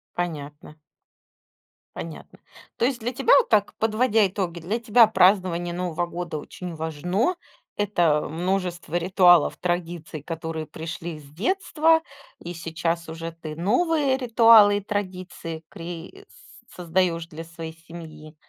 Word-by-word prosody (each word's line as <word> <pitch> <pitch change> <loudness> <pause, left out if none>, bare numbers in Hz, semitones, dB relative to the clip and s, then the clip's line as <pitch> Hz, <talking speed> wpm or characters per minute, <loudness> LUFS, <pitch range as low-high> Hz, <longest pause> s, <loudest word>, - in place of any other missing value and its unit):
Понятно. 150 -3 -5 1.2
Понятно. - - -9 0.4
То 235 - +2
есть, 255 -1 0
для 235 +2 -2
тебя, 460 - +3 0.2
так, 205 -1 +2
подводя 220 0 +2
итоги, 180 -3 -3 0.2
тебя 230 0 +5
празднование 180 -4 +3
Нового 175 -1 -2
года 170 -2 -5
очень 175 +3 -8
важно. 175 - -1 0.4
Это 175 -7 +2
множество 175 0 -2
ритуалов, 175 -2 +4
традиций, 170 -3 -3
которые 160 0 -5
пришли 165 +1 -7
с 150 - -15
детства, 320 - +1 0.4
и 175 - -7
сейчас 165 0 -3
уже 165 +1 -6
ты 160 -2 -8
новые 265 - +1
ритуалы 225 -4 +6
и 205 - -3
традиции 185 -5 -5
кри 175 - -9
с - - -20 0.3
создаешь 175 -1 0
для 165 0 -8
своей 165 -1 -8
семьи, 155 -2 -11
175 Hz, 120 wpm, -24 LUFS, 165-205 Hz, 1.2 s, ритуалы